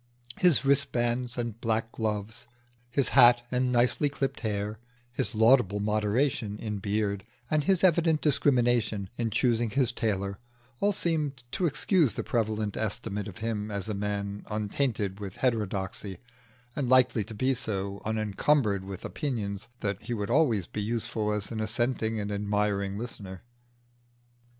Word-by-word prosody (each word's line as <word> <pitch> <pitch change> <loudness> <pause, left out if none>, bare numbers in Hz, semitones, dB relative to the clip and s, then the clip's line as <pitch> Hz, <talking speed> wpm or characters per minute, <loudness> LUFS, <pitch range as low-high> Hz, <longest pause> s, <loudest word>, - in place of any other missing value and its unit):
His 160 -7 +4
wristbands 125 -3 +1
and 115 -1 -4
black 110 0 0
gloves, 110 +1 -3 0.4
his 135 +2 +3
hat 120 -2 +7
and 125 0 +1
nicely 125 +4 +3
clipped 135 -1 -3
hair, 105 -1 -3 0.3
his 120 -1 -2
laudable 110 -3 +4
moderation 105 +1 0
in 105 -1 -4
beard, 100 -1 -1 0.3
and 155 -2 +2
his 190 0 +2
evident 165 -3 +4
discrimination 120 -9 +2
in 115 -1 0
choosing 120 +1 +1
his 130 +1 +2
tailor, 100 -3 -2 0.4
all 205 - +3
seemed 155 -9 -1
to 175 +6 +1
excuse 150 - +2
the - - -3
prevalent 110 -3 -1
estimate 105 -1 -2
of 95 - -9
him 110 -2 -2
as 100 -1 -3
a 110 - -2
man 100 0 -3
untainted 105 -2 -1
with 100 -2 -6
heterodoxy, 105 -4 -1 0.6
and 135 -4 -1
likely 125 -3 +4
to 110 +2 -9
be 130 +5 +1
so 100 -5 -3
unencumbered 110 0 +1
with 95 -1 -7
opinions 110 -8 -3
that 100 -2 -2
he 120 - -4
would 105 +1 -3
always 120 - +3
be 105 - -5
useful 110 0 -1
as 105 0 -2
an 110 - -3
assenting 110 0 0
and 105 0 -3
admiring 100 -1 -1
listener. 100 -5 -7
110 Hz, 145 wpm, -28 LUFS, 105-125 Hz, 0.6 s, hat